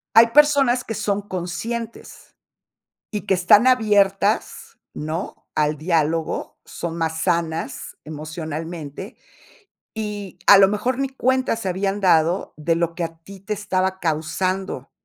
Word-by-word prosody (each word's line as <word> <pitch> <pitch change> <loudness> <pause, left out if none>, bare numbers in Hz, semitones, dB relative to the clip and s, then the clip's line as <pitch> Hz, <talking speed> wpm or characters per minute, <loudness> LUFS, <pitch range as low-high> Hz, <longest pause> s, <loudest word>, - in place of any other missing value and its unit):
Hay 230 +1 +9
personas 275 -2 +4
que 225 - -5
son 205 -1 -1
conscientes, 205 +5 -6 0.8
y 210 -2 -3
que 200 - +1
están 195 +6 +5
abiertas, 210 -4 +2
¿no?, 155 +4 -5
al 150 0 +1
diálogo, 160 0 -1
son 170 -1 -6
más 160 -1 -2
sanas 165 -2 -2
emocionalmente, 155 - -6 0.8
y 210 -4 -5
a 200 - +10
lo 195 -1 +7
mejor 240 +5 -1
ni 275 0 0
cuenta 260 -1 +1
se 225 -4 -4
habían 195 +2 -1
dado 175 -1 +2
de 165 +2 0
lo 170 0 -1
que 170 - -2
a 165 0 -7
ti 195 +4 -13
te 195 +3 -5
estaba 190 -2 -1
causando 165 0 -2
190 Hz, 130 wpm, -22 LUFS, 165-210 Hz, 0.8 s, a